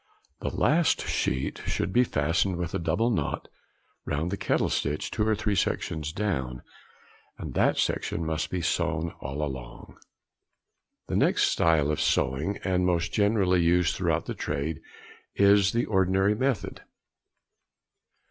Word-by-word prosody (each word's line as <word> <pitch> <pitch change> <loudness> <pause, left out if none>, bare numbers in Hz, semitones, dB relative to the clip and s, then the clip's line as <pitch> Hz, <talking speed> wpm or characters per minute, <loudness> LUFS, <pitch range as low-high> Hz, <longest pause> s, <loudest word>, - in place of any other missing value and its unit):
The - - -2
last 165 +2 +2
sheet 65 +1 -1
should 95 - -1
be 125 - +5
fastened 85 0 0
with 85 -1 -4
a - - -1
double 90 +9 +1
knot 110 - -2 0.6
round 80 +4 -2
the - - 0
kettle - - 0
stitch 75 +2 -2
two 105 -1 0
or 110 - +3
three 105 0 -1
sections 80 -4 -1
down, 65 -11 -3 0.7
and - - -7
that - - +2
section 85 - -1
must 80 0 -2
be 90 +1 -2
sewn 85 -1 -1
all 70 +2 -4
along. 65 -4 -7 1.1
The - - -3
next - - +3
style 80 -3 +2
of 75 - -1
sewing, 75 +10 0
and 90 -1 +1
most 85 -2 0
generally 100 -4 +3
used 85 0 +2
throughout - - 0
the - - -4
trade, 75 +1 -3 0.5
is 100 0 +5
the 120 +1 0
ordinary 95 0 +2
method. 130 +1 -2
90 Hz, 140 wpm, -27 LUFS, 75-100 Hz, 1.1 s, be